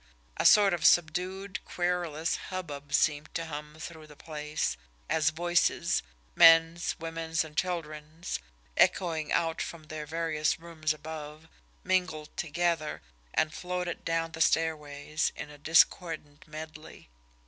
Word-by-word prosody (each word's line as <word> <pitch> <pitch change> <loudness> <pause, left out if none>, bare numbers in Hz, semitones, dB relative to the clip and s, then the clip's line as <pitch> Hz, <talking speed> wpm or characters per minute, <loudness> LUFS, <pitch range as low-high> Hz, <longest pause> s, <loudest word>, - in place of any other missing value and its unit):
A - - +5
sort 205 -3 +7
of 170 -2 -2
subdued, 180 +4 +2
querulous 175 -3 -1
hubbub 145 -7 -6
seemed 150 +1 +2
to 165 - -1
hum 150 -1 -7
through 160 -1 -8
the 150 - -14
place, 150 0 -3 0.3
as 160 -1 +3
voices, 175 +2 +1 0.3
men's, 165 0 +6
women's, 165 0 -2
and 155 -1 -12
children's, 160 -2 -3 0.4
echoing 160 -4 +2
out 165 -1 +1
from 170 -2 -6
their 155 0 -7
various 160 -1 0
rooms 165 -2 -2
above, 155 0 -7 0.4
mingled 180 -5 -1
together, 165 -1 -1 0.3
and 155 - +2
floated 180 -1 -4
down 165 0 -1
the 160 +1 -6
stairways 155 -2 +1
in 150 - -7
a 145 - -13
discordant 160 -1 +2
medley. 155 0 -9
160 Hz, 125 wpm, -29 LUFS, 155-170 Hz, 0.4 s, sort